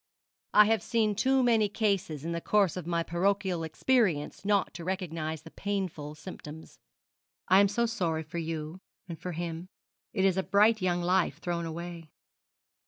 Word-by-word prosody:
'I 210 Hz, -, +9 dB
have 220 Hz, -1 st, +2 dB
seen 220 Hz, 0 st, +1 dB
too 265 Hz, +5 st, +2 dB
many 225 Hz, -4 st, +3 dB
cases 195 Hz, -8 st, -1 dB
in 170 Hz, -, -2 dB
the 170 Hz, 0 st, -2 dB
course 200 Hz, -3 st, +2 dB
of 180 Hz, -3 st, -6 dB
my 170 Hz, -1 st, 0 dB
parochial 185 Hz, 0 st, 0 dB
experience 175 Hz, -, +1 dB
not 200 Hz, -1 st, +1 dB
to 170 Hz, +2 st, -7 dB
recognise 165 Hz, -4 st, -3 dB
the 165 Hz, -, -12 dB
painful 185 Hz, -7 st, -4 dB
symptoms. 160 Hz, -2 st, -10 dB, 0.7 s
I 190 Hz, -, +7 dB
am 200 Hz, -, +6 dB
so 235 Hz, +4 st, 0 dB
sorry 170 Hz, -8 st, -1 dB
for 170 Hz, +3 st, -6 dB
you 160 Hz, +1 st, -4 dB, 0.3 s
and 170 Hz, -3 st, -7 dB
for 180 Hz, -, -5 dB
him. 170 Hz, +1 st, -5 dB, 0.4 s
It 195 Hz, -4 st, +1 dB
is 190 Hz, -1 st, +3 dB
a -, -, +3 dB
bright 210 Hz, +3 st, +3 dB
young 175 Hz, -1 st, 0 dB
life 180 Hz, +1 st, +2 dB
thrown 170 Hz, -1 st, -3 dB
away.' 170 Hz, 0 st, -7 dB
180 Hz, 170 wpm, -29 LUFS, 165-205 Hz, 0.7 s, I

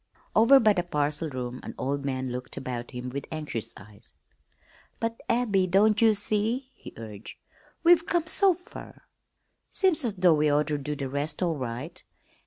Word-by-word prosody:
Over 245 Hz, +5 st, +7 dB
by 215 Hz, -3 st, +4 dB
the 180 Hz, -, 0 dB
parcel 150 Hz, -2 st, -1 dB
room 125 Hz, -2 st, -5 dB
an -, -, -8 dB
old 140 Hz, +1 st, -2 dB
man 130 Hz, -2 st, -2 dB
looked 125 Hz, 0 st, -7 dB
about 120 Hz, -2 st, -5 dB
him 125 Hz, -1 st, -6 dB
with 140 Hz, +2 st, -5 dB
anxious 150 Hz, -8 st, -5 dB
eyes. 105 Hz, 0 st, -16 dB, 0.8 s
"But, 230 Hz, 0 st, -3 dB
Abby, 210 Hz, -6 st, +2 dB
don't 205 Hz, +4 st, +3 dB
ye 225 Hz, -1 st, +6 dB
see?" 215 Hz, +6 st, -1 dB
he -, -, -12 dB
urged. 110 Hz, -2 st, -9 dB, 0.5 s
"We've 340 Hz, 0 st, +5 dB
come 345 Hz, -2 st, +1 dB
so 375 Hz, +3 st, +4 dB
fer, 360 Hz, +1 st, -13 dB, 0.7 s
seems 370 Hz, -6 st, +2 dB
as 225 Hz, -5 st, -1 dB
though 180 Hz, -3 st, +4 dB
we 150 Hz, -1 st, +2 dB
oughter 150 Hz, 0 st, +1 dB
do 150 Hz, +2 st, -4 dB
the 140 Hz, -1 st, -4 dB
rest 145 Hz, +6 st, -3 dB
all 170 Hz, -2 st, 0 dB
right. 130 Hz, +6 st, -6 dB
155 Hz, 170 wpm, -27 LUFS, 130-220 Hz, 0.8 s, Over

